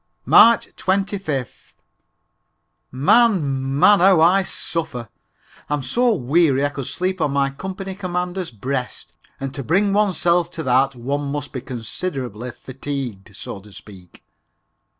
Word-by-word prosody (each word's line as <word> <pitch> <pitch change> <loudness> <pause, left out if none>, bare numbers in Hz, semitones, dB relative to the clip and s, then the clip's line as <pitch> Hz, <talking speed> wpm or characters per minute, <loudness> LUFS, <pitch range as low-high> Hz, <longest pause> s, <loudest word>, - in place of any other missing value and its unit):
March 235 0 +5
25th. 190 - -3 1.2
Man! 140 - +2
Man! 205 +7 +6
How 185 -1 +5
I 180 +4 +5
suffer! 160 - -2 0.6
I'm 145 -2 -1
so 235 - +2
weary 145 -1 +2
I - - +1
could 140 -3 -6
sleep 185 0 -2
on 150 - +2
my 140 -1 +1
company 190 +5 -6
commander's 180 -1 -3
breast, 125 -6 -5 0.3
and 135 0 -5
to 140 0 -4
bring 195 - +2
oneself 175 -4 +2
to 160 - -5
that 130 +1 +2
one 140 +4 -3
must 145 -1 -5
be 130 - -4
considerably 125 - -5
fatigued, 125 -6 -7
so 100 - -7
to 105 +2 -16
speak. 95 -3 -14
145 Hz, 130 wpm, -21 LUFS, 130-185 Hz, 1.2 s, Man